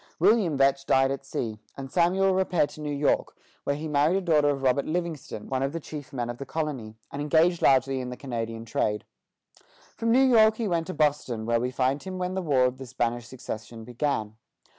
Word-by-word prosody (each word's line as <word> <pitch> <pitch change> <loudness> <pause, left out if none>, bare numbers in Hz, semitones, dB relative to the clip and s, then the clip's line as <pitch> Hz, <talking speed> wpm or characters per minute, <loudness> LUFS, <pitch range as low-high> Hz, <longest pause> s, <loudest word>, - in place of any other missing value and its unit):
William 190 -4 +3
Vetch 135 0 +2
died 135 0 +4
at 135 0 -4
sea, 115 -5 -4 0.2
and 135 -1 -7
Samuel 190 +2 +3
repaired 185 -5 +1
to 155 - -11
New 150 - -3
York, 145 0 0 0.3
where 140 - +1
he 155 +2 -5
married 150 +3 +2
a - - -1
daughter 155 -5 +3
of 135 -2 -2
Robert 135 +2 +2
Livingston, 160 -9 -4
one 130 -1 -1
of 135 +2 -1
the 165 - -3
chief 150 -3 -8
men 120 -3 -3
of 120 0 -6
the - - -4
colony, 135 -9 -4 0.2
and 140 - -4
engaged 160 +4 +3
largely 135 0 +3
in 125 - -5
the 125 - -7
Canadian 115 -3 -5
trade. 105 -2 -1 0.9
From 230 0 0
New 260 +3 +5
York 220 -4 +6
he 230 - -1
went 170 -3 0
to 185 - -5
Boston, 140 -7 0
where 115 0 +2
we 125 - 0
find 130 +2 0
him 190 -1 -6
when 180 0 -2
the 190 - -1
War 140 -7 +3
of 125 +1 -1
the 130 - -7
Spanish 120 -1 -2
Succession 115 -2 -7
began. 120 -3 -2
140 Hz, 215 wpm, -27 LUFS, 125-165 Hz, 0.9 s, York